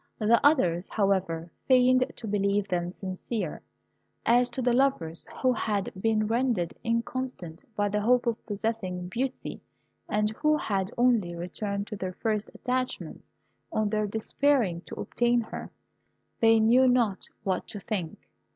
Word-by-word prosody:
The 225 Hz, +1 st, +3 dB
others, 190 Hz, -, +3 dB
however, 185 Hz, -5 st, 0 dB, 0.2 s
feigned 255 Hz, 0 st, +5 dB
to 235 Hz, -, -7 dB
believe 200 Hz, 0 st, +1 dB
them 175 Hz, -2 st, -1 dB
sincere. 185 Hz, 0 st, -4 dB, 0.6 s
As 245 Hz, +1 st, +4 dB
to 245 Hz, -, -6 dB
the 245 Hz, -1 st, +2 dB
lovers, 240 Hz, -12 st, +1 dB, 0.2 s
who 255 Hz, -1 st, +4 dB
had 210 Hz, -4 st, -1 dB
been 220 Hz, -1 st, +2 dB
rendered 225 Hz, -6 st, 0 dB
inconstant 230 Hz, -7 st, -3 dB
by 205 Hz, -1 st, +1 dB
the 210 Hz, +1 st, 0 dB
hope 245 Hz, +3 st, +3 dB
of 235 Hz, -1 st, -1 dB
possessing 200 Hz, -4 st, -3 dB
Beauty, 255 Hz, +6 st, -3 dB, 0.5 s
and 210 Hz, 0 st, +1 dB
who 305 Hz, +7 st, +2 dB
had 195 Hz, -7 st, -1 dB
only 235 Hz, -8 st, +3 dB
returned 200 Hz, +4 st, -3 dB
to 210 Hz, -, -6 dB
their 185 Hz, -2 st, -4 dB
first 215 Hz, +1 st, -1 dB
attachments 250 Hz, -, -3 dB, 0.4 s
on 215 Hz, -1 st, +1 dB
their 215 Hz, 0 st, 0 dB
despairing 220 Hz, -3 st, +1 dB
to -, -, -8 dB
obtain 240 Hz, 0 st, +1 dB
her, 225 Hz, -, -7 dB, 0.7 s
they 225 Hz, 0 st, +5 dB
knew 240 Hz, +4 st, +5 dB
not 235 Hz, -6 st, +2 dB, 0.2 s
what 185 Hz, -2 st, -1 dB
to 205 Hz, -, -7 dB
think. 185 Hz, -5 st, -4 dB
215 Hz, 140 wpm, -28 LUFS, 190-245 Hz, 0.7 s, feigned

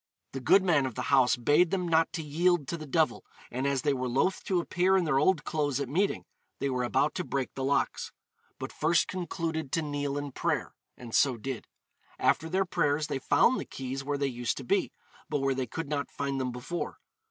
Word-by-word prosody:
The 135 Hz, -, -4 dB
good 185 Hz, -, +5 dB
man 155 Hz, -8 st, +3 dB
of 125 Hz, -, -7 dB
the -, -, -3 dB
house 130 Hz, -2 st, +5 dB
bade 145 Hz, +8 st, +3 dB
them 180 Hz, -1 st, -1 dB
not 165 Hz, -1 st, +3 dB
to 165 Hz, -3 st, -3 dB
yield 165 Hz, 0 st, +1 dB
to -, -, -1 dB
the 155 Hz, -2 st, -8 dB
devil, 160 Hz, +2 st, +1 dB, 0.3 s
and 130 Hz, +3 st, -1 dB
as 140 Hz, -2 st, 0 dB
they 145 Hz, -2 st, +2 dB
were 130 Hz, -1 st, -2 dB
loth 140 Hz, +10 st, +1 dB
to 185 Hz, -2 st, +1 dB
appear 180 Hz, +2 st, +2 dB
in 185 Hz, -, +2 dB
their 135 Hz, -4 st, +2 dB
old 155 Hz, +1 st, +3 dB
clothes 145 Hz, -3 st, -1 dB
at 140 Hz, -, -2 dB
meeting, 185 Hz, +10 st, 0 dB, 0.3 s
they 140 Hz, -, -1 dB
were 125 Hz, -1 st, 0 dB
about 140 Hz, +5 st, +1 dB
to 185 Hz, -, -2 dB
break 135 Hz, -5 st, -3 dB
the 135 Hz, -, -4 dB
locks; 140 Hz, +1 st, 0 dB, 0.5 s
but -, -, -6 dB
first 160 Hz, +2 st, +2 dB
concluded 165 Hz, -4 st, -3 dB
to 165 Hz, -, +1 dB
kneel 145 Hz, -1 st, -2 dB
in 145 Hz, -1 st, -4 dB
prayer, -, -, -1 dB, 0.2 s
and 120 Hz, -2 st, -10 dB
so 130 Hz, -4 st, +3 dB
did. 130 Hz, +1 st, -5 dB, 0.5 s
After 160 Hz, -, +2 dB
their 190 Hz, +3 st, +1 dB
prayers 150 Hz, -4 st, +1 dB
they 135 Hz, -, -3 dB
found 245 Hz, -, +3 dB
the -, -, -3 dB
keys 135 Hz, +1 st, -5 dB
where 145 Hz, +1 st, -1 dB
they 140 Hz, -, 0 dB
used 120 Hz, -3 st, -2 dB
to -, -, -5 dB
be, -, -, +1 dB, 0.4 s
but -, -, 0 dB
where 135 Hz, 0 st, +2 dB
they 130 Hz, -1 st, -2 dB
could 160 Hz, +7 st, -5 dB
not 145 Hz, -1 st, -2 dB
find 140 Hz, -1 st, -2 dB
them 125 Hz, -1 st, -1 dB
before. 125 Hz, +8 st, -5 dB
145 Hz, 220 wpm, -29 LUFS, 135-165 Hz, 0.5 s, good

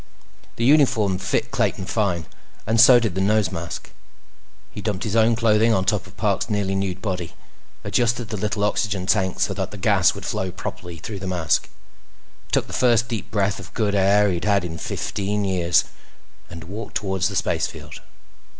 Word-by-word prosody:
The 115 Hz, -, -1 dB
uniform 115 Hz, -10 st, +3 dB
fit 95 Hz, -, -1 dB
Clayton 95 Hz, -, 0 dB
fine, 95 Hz, -4 st, -1 dB, 0.4 s
and 115 Hz, +1 st, +4 dB
so 120 Hz, 0 st, +8 dB
did 110 Hz, -6 st, -1 dB
the 95 Hz, -, -1 dB
nose 105 Hz, +1 st, +2 dB
mask. 85 Hz, 0 st, -6 dB, 0.8 s
He 105 Hz, -, -7 dB
dumped 100 Hz, -2 st, -2 dB
his 110 Hz, -2 st, -2 dB
own 115 Hz, +1 st, +4 dB
clothing 115 Hz, 0 st, +3 dB
on 95 Hz, 0 st, 0 dB
top -, -, 0 dB
of -, -, -17 dB
Parks' -, -, 0 dB
nearly 100 Hz, -2 st, 0 dB
nude 95 Hz, -1 st, -2 dB
body, 90 Hz, -5 st, -3 dB, 0.5 s
adjusted 120 Hz, -1 st, 0 dB
the 105 Hz, -, -3 dB
little 105 Hz, 0 st, -1 dB
oxygen 105 Hz, -2 st, 0 dB
tank 95 Hz, 0 st, +1 dB
so -, -, +1 dB
that -, -, -3 dB
the -, -, -9 dB
gas -, -, +3 dB
would -, -, -8 dB
flow 95 Hz, -, -2 dB
properly 90 Hz, -2 st, -7 dB
through 100 Hz, +5 st, -7 dB
the 95 Hz, -, -6 dB
mask, 85 Hz, -4 st, 0 dB, 0.8 s
took -, -, +2 dB
the -, -, -11 dB
first 120 Hz, -1 st, +3 dB
deep 115 Hz, -3 st, -4 dB
breath 100 Hz, -1 st, 0 dB
of -, -, -12 dB
good 105 Hz, -3 st, 0 dB
air 100 Hz, +1 st, +4 dB
he'd 85 Hz, -2 st, -3 dB
had 100 Hz, -3 st, +2 dB
in 80 Hz, -1 st, -6 dB
fifteen 100 Hz, +6 st, -2 dB
years, 90 Hz, -3 st, +2 dB, 0.7 s
and 85 Hz, 0 st, -9 dB
walked 100 Hz, +7 st, -8 dB
toward 95 Hz, -2 st, -2 dB
the 95 Hz, +2 st, +1 dB
spacefield. -, -, -2 dB
100 Hz, 180 wpm, -22 LUFS, 95-110 Hz, 0.8 s, so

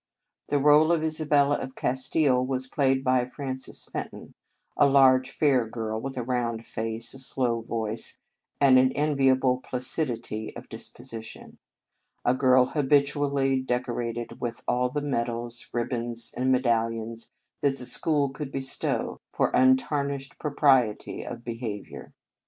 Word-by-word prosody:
The 145 Hz, -, +2 dB
role 150 Hz, +3 st, +5 dB
of 165 Hz, -2 st, +1 dB
Isabella 150 Hz, -2 st, +2 dB
of 130 Hz, -, -7 dB
Castile 130 Hz, 0 st, +1 dB
was 130 Hz, 0 st, -1 dB
played 135 Hz, 0 st, +1 dB
by 130 Hz, -1 st, +3 dB
Frances 130 Hz, 0 st, -5 dB
Fenton, -, -, -7 dB, 0.4 s
a 145 Hz, -, +5 dB
large, 130 Hz, -1 st, +5 dB
fair 130 Hz, -5 st, +2 dB
girl, 110 Hz, -1 st, -4 dB
with 135 Hz, +1 st, -5 dB
a 125 Hz, -, -1 dB
round 115 Hz, -2 st, -2 dB
face, 115 Hz, +1 st, -4 dB
a 135 Hz, -, -9 dB
slow 125 Hz, -3 st, 0 dB
voice, 110 Hz, -1 st, -3 dB, 0.4 s
and 130 Hz, -2 st, +6 dB
an 130 Hz, 0 st, +4 dB
enviable 135 Hz, -3 st, +2 dB
placidity 125 Hz, -4 st, -3 dB
of -, -, -9 dB
dis -, -, -4 dB
position; 110 Hz, -1 st, -9 dB, 0.7 s
a 125 Hz, -, +4 dB
girl 130 Hz, -1 st, +4 dB
habitually 140 Hz, -1 st, +1 dB
decorated 120 Hz, -2 st, -3 dB
with 120 Hz, -1 st, -4 dB
all 125 Hz, +1 st, +1 dB
the 145 Hz, +3 st, -3 dB
medals, 120 Hz, -3 st, -3 dB
ribbons, 120 Hz, -1 st, -2 dB
and 130 Hz, +1 st, +1 dB
me 130 Hz, -, +5 dB
dallions 115 Hz, -1 st, -1 dB, 0.3 s
that 140 Hz, -1 st, +2 dB
the 125 Hz, -, -3 dB
school 145 Hz, +3 st, +1 dB
could 135 Hz, +1 st, -7 dB
bestow 135 Hz, -1 st, -1 dB
for -, -, +1 dB
untarnished 140 Hz, +2 st, +1 dB
propriety 135 Hz, -7 st, +2 dB
of 115 Hz, -, -7 dB
beha 115 Hz, -4 st, -5 dB
viour. -, -, -12 dB
130 Hz, 140 wpm, -26 LUFS, 120-140 Hz, 0.7 s, and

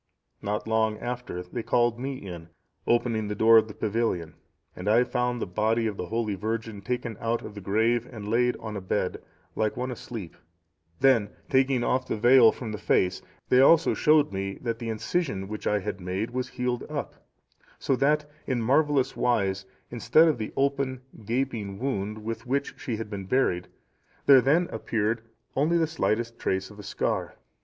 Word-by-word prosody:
Not 105 Hz, +2 st, -3 dB
long 110 Hz, -1 st, +1 dB
after 120 Hz, -6 st, -5 dB
they 105 Hz, +7 st, -5 dB
called 120 Hz, 0 st, +1 dB
me 135 Hz, +2 st, -3 dB
in, 85 Hz, -8 st, -9 dB, 0.4 s
opening 115 Hz, -3 st, +1 dB
the 105 Hz, -, -3 dB
door 115 Hz, +2 st, +7 dB
of 110 Hz, -, -2 dB
the 105 Hz, -, -10 dB
pavilion, 105 Hz, -7 st, -1 dB, 0.4 s
and 90 Hz, +3 st, -3 dB
I 115 Hz, +3 st, +5 dB
found 125 Hz, -1 st, -1 dB
the -, -, -2 dB
body 110 Hz, +5 st, 0 dB
of 110 Hz, -2 st, -1 dB
the 90 Hz, -, -4 dB
holy 115 Hz, -1 st, -1 dB
virgin 110 Hz, +1 st, -4 dB
taken 120 Hz, +1 st, -3 dB
out 115 Hz, 0 st, -1 dB
of 105 Hz, -, -8 dB
the 100 Hz, -, -8 dB
grave 115 Hz, +5 st, +1 dB
and 110 Hz, -4 st, -8 dB
laid 120 Hz, +3 st, +2 dB
on 110 Hz, -1 st, -7 dB
a 100 Hz, -, -4 dB
bed, 95 Hz, 0 st, -2 dB, 0.3 s
like 110 Hz, +1 st, 0 dB
one 125 Hz, +1 st, -2 dB
asleep; 110 Hz, -7 st, -7 dB, 0.7 s
then 130 Hz, -6 st, +4 dB, 0.2 s
taking 130 Hz, -2 st, +3 dB
off 130 Hz, +1 st, 0 dB
the -, -, -2 dB
veil 120 Hz, 0 st, +7 dB
from 115 Hz, -4 st, -6 dB
the 105 Hz, -, -5 dB
face, 95 Hz, -3 st, +1 dB, 0.3 s
they 125 Hz, -, +6 dB
also 165 Hz, +4 st, +6 dB
showed 150 Hz, -5 st, +3 dB
me 95 Hz, 0 st, -3 dB
that 115 Hz, -1 st, -2 dB
the 115 Hz, -, -4 dB
incision 110 Hz, -, -2 dB
which 105 Hz, +1 st, -5 dB
I 105 Hz, -, +2 dB
had 95 Hz, -1 st, -4 dB
made 95 Hz, +6 st, -3 dB
was 125 Hz, 0 st, -3 dB
healed 125 Hz, -1 st, -2 dB
up; -, -, -5 dB, 0.5 s
so 135 Hz, -, 0 dB
that, 150 Hz, +3 st, +2 dB, 0.2 s
in 130 Hz, -3 st, 0 dB
marvellous 140 Hz, +3 st, +2 dB
wise, 95 Hz, -5 st, 0 dB, 0.2 s
instead 155 Hz, +7 st, +4 dB
of 155 Hz, -7 st, +1 dB
the 110 Hz, -, -4 dB
open 140 Hz, -2 st, 0 dB, 0.2 s
gaping 115 Hz, -4 st, -2 dB
wound 110 Hz, -4 st, -3 dB
with 115 Hz, +1 st, -5 dB
which 140 Hz, +2 st, -1 dB
she 130 Hz, -8 st, -4 dB
had 110 Hz, -1 st, -6 dB
been 100 Hz, -2 st, -5 dB
buried, 90 Hz, -7 st, +1 dB, 0.6 s
there 135 Hz, -2 st, +8 dB
then 160 Hz, +7 st, +3 dB
appeared 110 Hz, 0 st, -1 dB, 0.3 s
only 155 Hz, +5 st, +2 dB
the 165 Hz, -, +3 dB
slightest 115 Hz, -7 st, -1 dB
trace 95 Hz, +2 st, -1 dB
of 105 Hz, -, -14 dB
a -, -, -8 dB
scar. 100 Hz, -, -2 dB
115 Hz, 180 wpm, -27 LUFS, 105-125 Hz, 0.7 s, there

